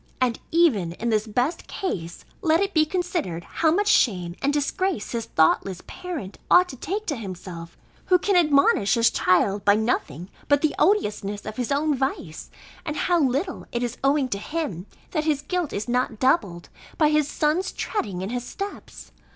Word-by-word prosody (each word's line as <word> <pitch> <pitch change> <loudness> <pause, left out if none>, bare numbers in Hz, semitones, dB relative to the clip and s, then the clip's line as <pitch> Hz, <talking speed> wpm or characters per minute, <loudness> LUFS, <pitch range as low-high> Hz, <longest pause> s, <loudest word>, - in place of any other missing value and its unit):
And 250 -3 +1
even 240 - +2
in 235 +6 -3
this 215 0 +1
best 245 +9 -1
case, 170 - -5 0.2
let 325 -3 +3
it 395 0 -1
be 310 -2 +3
considered, 335 - -2
how 320 - 0
much 405 +6 +2
shame 180 - +2
and 280 - +2
disgrace 295 - -1
his 230 -2 -2
thoughtless 175 +3 +1
parent 325 - -7
ought 360 +1 +6
to 265 - -7
take 395 - -4
to 300 - -1
himself, 180 -6 -8 0.3
who 365 - +5
can 395 +2 0
admonish 280 - +4
his 230 0 +4
child 195 +2 +2
by 205 0 +5
nothing 205 - -2 0.2
but 285 0 +3
the 310 - +2
odiousness 210 - +1
of 215 0 -6
his 250 +1 -2
own 295 +2 +2
vice; 260 - -3 0.3
and 305 - -4
how 350 -2 +2
little 280 +7 -1
it 240 0 -2
is 240 0 -4
owing 275 0 +3
to 200 - -2
him, 210 - -4 0.2
that 310 -3 -1
his 295 -3 0
guilt 360 -4 -2
is 205 +3 -4
not 245 -2 0
doubled, 200 - +1 0.3
by 305 -3 +4
his 300 -1 +2
son's 305 +5 0
treading 200 - -3
in 195 - -4
his 245 -1 -3
steps! 395 +10 -8
265 Hz, 180 wpm, -24 LUFS, 205-325 Hz, 0.3 s, ought